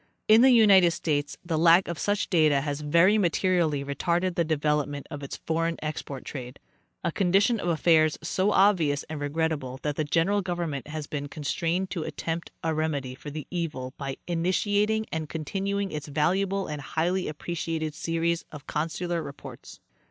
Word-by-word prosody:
In 220 +2 +7
the 265 - +7
United 205 -7 +7
States 150 -3 -2
the 165 -2 -1
lack 170 +3 +6
of 170 -2 -4
such 205 0 0
data 155 -5 +4
has 145 0 -3
very 170 +8 +4
materially 170 -5 +1
retarded 170 +6 0
the 170 - +1
development 150 -2 -1
of 145 -2 -6
its 140 - -6
foreign 165 +1 0
export 150 -3 -5
trade— 125 -2 -7 0.5
a 170 - 0
condition 195 +6 +2
of - - -3
affairs 160 -2 +3
so 190 +5 +1
obvious 170 -9 +3
and 155 - -4
regrettable 145 -3 -2
that 150 -1 -2
the 155 - +1
general 170 +7 +1
government 170 -7 -3
has 155 0 -5
been 145 -1 -4
constrained 165 +6 -2
to 175 - -2
attempt 165 +1 -4
a 160 -1 0
remedy 150 -5 -2
for 140 +3 -9
the 150 0 -6
evil 150 -8 -3
by 135 -2 -4
initiating 205 +5 +1
and 160 -2 -3
continuing 195 +5 -2
its 150 0 -5
valuable 190 +7 0
and 150 -1 -5
highly 175 +6 -1
appre 155 +3 -5
ciated 160 -2 -2
series 165 +2 -1
of 150 -3 -10
consular 165 +2 -2
reports. 140 -2 -10
165 Hz, 165 wpm, -27 LUFS, 150-180 Hz, 0.5 s, In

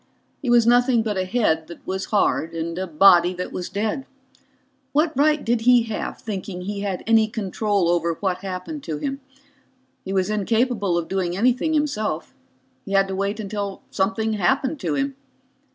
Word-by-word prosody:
He 270 - -2
was 240 -1 +5
nothing 245 0 +4
but 215 -2 -2
a 185 0 -1
head 185 -7 +1
that 170 - -12
was 190 0 -3
hard 165 -5 +1
and 165 0 -3
a 190 - -2
body 175 +2 +5
that 180 +1 -5
was 180 - -4
dead. 220 +7 -2 0.9
What 310 +1 +2
right 300 +2 +2
did 235 0 +1
he 245 0 +5
have 225 -2 -4
thinking 195 -3 -5
he 200 +2 -4
had 200 -2 -3
any 225 -1 +4
control 205 -3 -1
over 170 -1 +1
what 185 0 -2
happened 195 +11 -5
to 155 -2 -3
him? 275 - -4 0.8
He 190 - -5
was 190 +1 +1
incapable 215 -2 +1
of 170 -1 -2
doing 185 -2 -1
anything 255 +8 +2
himself 215 - -1 0.5
he 195 - -6
had 195 0 +4
to 190 - -3
wait 200 +3 -2
until 200 -1 -4
something 220 +3 0
happened 265 - +1
to - - -1
him. 275 0 -1
205 Hz, 175 wpm, -23 LUFS, 185-240 Hz, 0.9 s, was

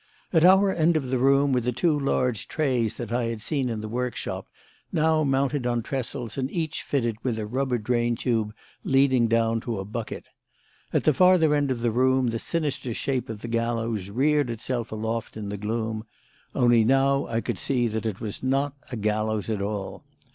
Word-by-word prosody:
At 165 -2 +5
our 190 +2 +6
end 165 0 +3
of 135 -4 -3
the 130 - +1
room 140 +1 +4
were 125 - +2
the 125 +2 0
two 155 +6 +1
large 125 -5 0
trays 125 -8 0
that 120 -2 -5
I 120 0 +1
had 115 -1 -3
seen 135 +2 -1
in 110 -2 -3
the 110 - -5
workshop, 125 +2 -3 0.4
now 160 0 +2
mounted 135 -1 +1
on 120 -1 0
trestles 130 -1 -4
and 130 0 -1
each 160 -2 -2
fitted 120 -6 -1
with 120 -4 -1
a 110 - -3
rubber 130 +3 -1
drain 120 +1 0
tube 115 -3 0 0.3
leading 135 -3 +3
down 115 0 +2
to 115 -2 -3
a 95 - -4
bucket. 110 +2 -5 0.7
At - - +1
the 155 - +4
farther 180 -1 +5
end 145 -1 +1
of 125 -3 -2
the 120 -1 +1
room 130 +1 +3
the 115 0 -2
sinister 140 -7 -2
shape 130 -2 -2
of 110 -2 -7
the - - -4
gallows 115 -3 -1
reared 145 +4 +2
itself 120 0 -3
aloft 110 +1 -3
in 105 -2 -5
the 100 - -3
gloom; 110 +1 -3 0.5
only 120 -2 +5
now 135 +3 +3
I 115 - -1
could - - -3
see 125 -3 +1
that 110 0 -2
it 100 -3 -4
was 105 -3 -5
not 135 +2 0 0.2
a - - -3
gallows 110 -1 -1
at 105 -2 -2
all. 100 -1 -4
120 Hz, 200 wpm, -25 LUFS, 115-135 Hz, 0.7 s, our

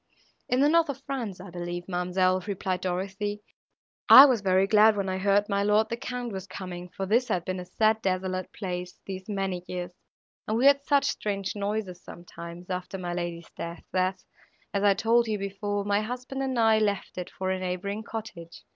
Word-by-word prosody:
—"In 250 +1 +2
the 285 - +5
north 330 -1 +4
of 275 0 -5
France, 240 -10 -4
I 180 0 -10
believe, 175 0 -5
ma'amselle," 185 0 +1
replied 185 -2 -2
Dorothée. 195 +3 -3 0.7
"I 270 - +12
was 250 -6 +2
very 190 0 +3
glad, 210 +1 +5
when 195 -1 -1
I 185 0 -2
heard 200 +1 +3
my 200 -1 0
lord 210 +2 +3
the 235 - -1
Count 245 0 -5
was 190 0 -6
coming, 180 -2 -7
for 195 - -4
this 235 +6 +2
had 175 -2 -1
been 185 0 -3
a 180 - -6
sad 220 +4 +2
desolate 185 -1 -2
place, 180 -2 -5
these 190 +1 -7
many 195 -3 -2
years, 180 -1 -5 0.5
and 220 - 0
we 250 - +2
heard 280 0 +6
such 285 -2 +3
strange 200 -2 -2
noises, 200 -3 -3
sometimes, 175 +1 -10
after 185 +1 -4
my 175 -2 -4
lady's 175 -1 -5
death, 170 +1 -6
that, 185 0 0 0.5
as 200 0 0
I 200 -1 +5
told 230 +2 +3
you 215 -1 -1
before, 200 +1 -3
my 205 0 +2
husband 250 +4 -5
and 265 -2 -1
I 225 -1 +4
left 205 -3 -1
it 180 - -5
for 185 0 -3
a 190 - -1
neighbouring 185 +3 -3
cottage. 210 -7 -8
195 Hz, 195 wpm, -27 LUFS, 180-220 Hz, 0.7 s, I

